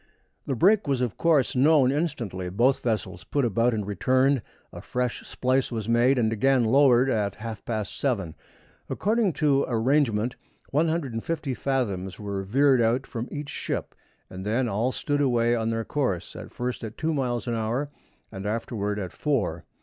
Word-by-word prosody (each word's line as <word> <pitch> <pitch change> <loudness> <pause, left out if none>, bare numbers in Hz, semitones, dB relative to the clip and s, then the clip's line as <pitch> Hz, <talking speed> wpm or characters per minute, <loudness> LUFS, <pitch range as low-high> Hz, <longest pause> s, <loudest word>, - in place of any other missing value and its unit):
The 135 - 0
break 195 - +4
was 135 -3 +1
of 125 -4 -1
course 150 -5 +2
known 135 0 +5
instantly, 120 - -2
both 120 +8 +2
vessels 110 -3 -2
put 140 -3 0
about 115 +2 +2
and 105 -3 -2
returned, 130 +6 +2 0.3
a - - -8
fresh 125 -1 -2
splice 130 +1 0
was 110 -3 -3
made, 120 +3 +3
and 110 -2 +2
again 130 +2 +3
lowered 130 +1 +5
over 120 -5 +1
at 100 -1 -2
half 110 -2 -7
past 110 -4 -3
seven. 100 - -1 0.6
According 215 -3 +1
to 140 -3 +2
arrangement, 120 -1 +1 0.4
150 155 -2 -1
fathoms 105 -9 -2
were 100 -2 -3
veered 130 +6 +3
out 120 +4 +1
from 120 -1 -5
each 145 -1 -5
ship, - - -4 0.3
and 95 0 -8
then 115 +5 0
all 115 +4 0
stood 145 +2 -1
away 120 -3 +2
on 115 -1 -1
their 115 -1 -2
course, 125 - -2
at - - -9
first 125 0 -4
at 110 -1 -7
two 160 +1 0
miles 125 -5 -1
an 120 - -2
hour, 115 +6 -2 0.4
and 95 +1 -6
afterward 105 -2 -2
at 95 -4 -4
four. 100 - -1
120 Hz, 170 wpm, -26 LUFS, 110-140 Hz, 0.6 s, known